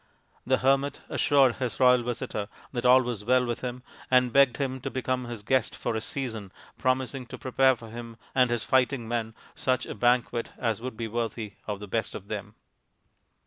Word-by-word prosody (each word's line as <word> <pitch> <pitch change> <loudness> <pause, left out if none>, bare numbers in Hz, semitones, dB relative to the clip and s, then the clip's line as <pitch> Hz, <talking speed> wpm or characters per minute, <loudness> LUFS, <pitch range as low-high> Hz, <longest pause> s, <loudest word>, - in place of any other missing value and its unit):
The 130 0 +4
hermit 135 +2 +1
assured 135 -4 +3
his 125 -3 -3
royal 125 -1 +6
visitor 115 -3 -3 0.2
that 125 -1 0
all 130 +1 +7
was 120 -4 -4
well 125 +3 +3
with 120 -1 -3
him, 125 0 -5 0.3
and 125 -1 +4
begged 140 -3 +5
him 130 -2 -2
to - - -3
become 130 -1 -2
his 120 -3 -7
guest 130 +1 +1
for - - -2
a 110 - -1
season, 110 -7 -4 0.2
promising 130 0 -1
to - - -8
prepare 130 0 +3
for 115 -2 -12
him 115 0 -8 0.2
and 130 -2 +4
his 120 -2 -1
fighting 130 -2 +2
men 115 -1 -2 0.2
such 130 -1 0
a - - -5
banquet 120 -1 +1
as 115 -2 -1
would 125 -2 -6
be 115 - -3
worthy 115 -2 -3
of 105 -2 -3
the 105 - -8
best 110 +3 -2
of 100 0 -9
them. - - -5
125 Hz, 190 wpm, -27 LUFS, 115-130 Hz, 0.3 s, all